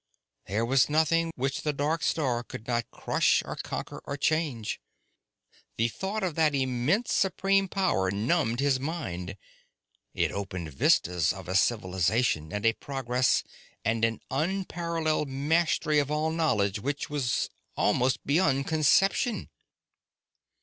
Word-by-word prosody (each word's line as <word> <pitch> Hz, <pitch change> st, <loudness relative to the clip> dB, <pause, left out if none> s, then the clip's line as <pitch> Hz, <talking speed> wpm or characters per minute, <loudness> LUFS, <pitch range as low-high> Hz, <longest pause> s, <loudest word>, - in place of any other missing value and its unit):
There 105 Hz, +4 st, 0 dB
was 130 Hz, +3 st, +3 dB
nothing 165 Hz, +2 st, +2 dB
which 135 Hz, +1 st, -2 dB
the 150 Hz, -, -1 dB
dark 150 Hz, +4 st, -1 dB
star 130 Hz, -7 st, 0 dB
could 115 Hz, -2 st, -9 dB
not 120 Hz, -1 st, -1 dB
crush -, -, +1 dB
or -, -, -5 dB
conquer -, -, -6 dB
or 140 Hz, -, -3 dB
change. 145 Hz, -7 st, -1 dB, 1.0 s
The 115 Hz, +1 st, +2 dB
thought 195 Hz, -, -4 dB
of 180 Hz, -4 st, -1 dB
that 155 Hz, -2 st, +2 dB
immense, 135 Hz, -, 0 dB
supreme 195 Hz, +1 st, +2 dB
power 180 Hz, -, +1 dB
numbed 120 Hz, -, 0 dB
his 140 Hz, -2 st, +2 dB
mind. 100 Hz, -, -4 dB, 0.8 s
It -, -, +1 dB
opened 90 Hz, -6 st, -5 dB
vistas 85 Hz, +4 st, +3 dB
of 95 Hz, -2 st, -8 dB
a 95 Hz, -, -3 dB
civilization, 95 Hz, -4 st, +1 dB
and 105 Hz, +1 st, -3 dB
a 115 Hz, -, +5 dB
progress, 130 Hz, -1 st, 0 dB, 0.4 s
and 110 Hz, +1 st, 0 dB
an 115 Hz, -1 st, +1 dB
unparalleled 165 Hz, -1 st, -1 dB
mastery 150 Hz, +2 st, +1 dB
of 145 Hz, -1 st, 0 dB
all 155 Hz, +1 st, 0 dB
knowledge 110 Hz, -, +1 dB
which 145 Hz, +6 st, -3 dB
was 135 Hz, -5 st, -1 dB, 0.3 s
almost 130 Hz, +1 st, +1 dB
beyond 140 Hz, -3 st, +2 dB
conception. 195 Hz, -, +2 dB
135 Hz, 130 wpm, -28 LUFS, 115-160 Hz, 1.0 s, a